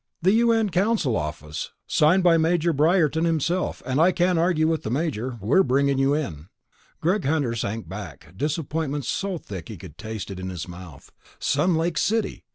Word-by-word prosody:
"The 185 - +5
U.N. 225 -2 +3
Council 185 - +1
office. 75 0 -4
Signed 170 +5 +3
by 175 -2 +6
Major 170 +1 +2
Briarton 160 +1 +2
himself 170 +2 -1
and 130 +3 +1
I 180 +3 +5
can't 180 -1 +2
argue 165 -2 +2
with 160 -1 0
the - - -4
Major. 130 -3 -2
We're 110 - +3
bringing 140 -1 +2
you 135 +1 +3
in." 85 - -4 0.5
Greg 180 +4 +1
Hunter 140 -4 0
sank 110 -3 -3
back, 95 -5 -9
disappointment 150 - -2
so 195 +5 -2
thick 95 - -8
he - - -7
could - - -12
taste 110 -3 -6
it 95 - -7
in 95 0 -5
his 90 -3 -6
mouth. 85 -5 -11 0.3
Sun 165 +5 +1
Lake 160 -1 0
City! 225 0 -1
150 Hz, 175 wpm, -24 LUFS, 110-175 Hz, 0.5 s, by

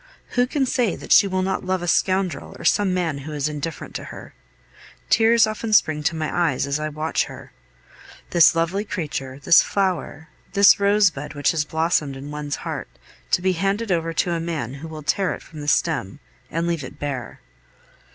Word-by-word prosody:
Who 245 0 +1
can 270 +1 0
say 245 -7 0
that - - -10
she 200 - +7
will 185 -1 -1
not 190 0 -2
love 185 -1 -1
a - - -3
scoundrel 185 +1 0
or - - -10
some 205 -2 +3
man 170 -6 -1
who 150 +3 -7
is 145 -1 -1
indifferent 150 +1 -5
to - - -6
her? - - -10 0.8
Tears 225 0 +5
often 215 0 -3
spring 155 -7 +4
to 165 - +1
my 155 -1 -3
eyes 130 - -1
as 140 +1 -1
I 155 0 -2
watch 155 +2 -1
her. - - -11 0.8
This 170 -1 +6
lovely 170 +5 0
creature, 145 -9 -4
this 165 - +7
flower, 180 -5 -2 0.2
this 200 0 +6
rosebud 200 -8 +2
which 145 - +2
has 155 -2 -1
blossomed 160 -3 0
in 140 +2 -8
one's 150 -1 -4
heart, - - -4 0.4
to 175 - +1
be 190 - +3
handed 195 +4 -1
over 165 -1 0
to 175 +2 0
a 170 - -1
man 160 -7 -4
who 140 +4 -8
will 155 -1 -8
tear 180 +6 0
it - - -13
from 155 -2 -11
the 145 - -7
stem 150 - 0 0.3
and 165 +1 -2
leave 170 -4 -1
it 135 +3 -9
bare! 140 -5 -5
165 Hz, 195 wpm, -22 LUFS, 150-190 Hz, 0.8 s, she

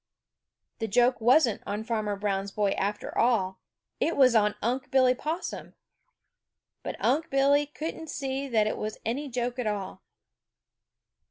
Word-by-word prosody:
The 225 - -2
joke 245 +4 +3
wasn't 245 0 +4
on 205 +2 -3
Farmer 215 -3 -1
Brown's 200 -1 -2
boy, 200 0 0
after 205 +2 -3
all; 195 -6 +1 0.4
it 335 - 0
was 260 -3 +6
on 210 -2 +3
Unc' 250 +4 -2
Billy 255 -1 +4
Possum. 315 +7 -5 1.1
But - - -5
Unc' 315 +4 +1
Billy 280 +2 +3
couldn't 320 +2 -6
see 270 0 -3
that 220 -5 +2
it 215 - -2
was 215 0 -4
any 275 +6 -2
joke 245 0 -3
at 245 - -1
all. 200 -3 -4
240 Hz, 145 wpm, -28 LUFS, 210-270 Hz, 1.1 s, was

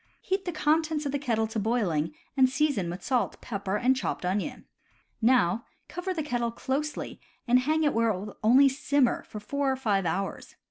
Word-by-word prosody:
Heat 385 +1 -2
the 355 - -1
contents 310 0 +1
of 280 - -1
the 285 - -1
kettle 230 -5 0
to 220 0 -3
boiling, 205 - 0 0.2
and 260 -2 +5
season 265 - 0
with 175 +2 -6
salt, 255 -3 0
pepper, 200 -3 -3
and 250 +5 +3
chopped 260 - -3
onion. 190 +3 -2 0.6
Now 230 -3 +3 0.2
cover 360 +1 -4
the 325 -4 -2
kettle 245 -5 -1
closely 275 +6 -3 0.3
and 245 +1 +5
hang 310 +5 +1
it 295 - +2
where 230 0 +2
it 205 - 0
will 205 +1 -8
only 255 +6 +7
simmer 275 -1 +1
for 215 - -9
four 275 +6 -1
or - - 0
five 205 -8 0
hours. 195 +4 -3
250 Hz, 190 wpm, -28 LUFS, 210-285 Hz, 0.6 s, only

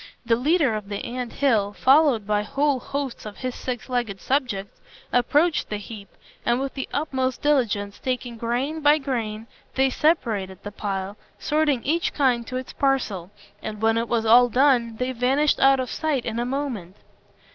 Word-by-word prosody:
The 230 -1 +3
leader 285 +1 +2
of 210 -2 -5
the 200 -1 -4
ant 245 0 -4
hill, 220 -8 +1
followed 265 -3 +4
by 210 0 +1
whole 275 +5 0
hosts 275 0 -4
of 210 - -9
his 255 -1 -3
six 245 -2 -5
legged 240 -6 -2
subjects, 245 -8 -2 0.3
approached 295 +7 +2
the 210 - -2
heap, 205 0 -9 0.3
and 240 +1 +1
with 270 0 -3
the 270 - -5
utmost 260 -4 -2
diligence, 220 -9 +1
taking 250 -2 -3
grain 245 +7 -2
by 295 +1 +5
grain, 230 -6 -3 0.3
they 265 0 +3
separated 220 - 0
the 205 - -6
pile, 195 0 -4 0.2
sorting 295 -5 +1
each 330 +5 0
kind 245 -5 +2
to 255 - -3
its 255 0 -6
parcel; 235 -10 0 0.3
and 215 -1 -6
when 225 +1 +2
it 230 0 -1
was 230 -1 +1
all 245 +2 +6
done, 245 -3 +3
they 250 +2 -1
vanished 265 +5 +2
out 270 0 +5
of 255 - -3
sight 300 -6 -1
in 225 - -2
a 240 - 0
moment. 245 -9 -4
245 Hz, 175 wpm, -24 LUFS, 220-275 Hz, 0.3 s, all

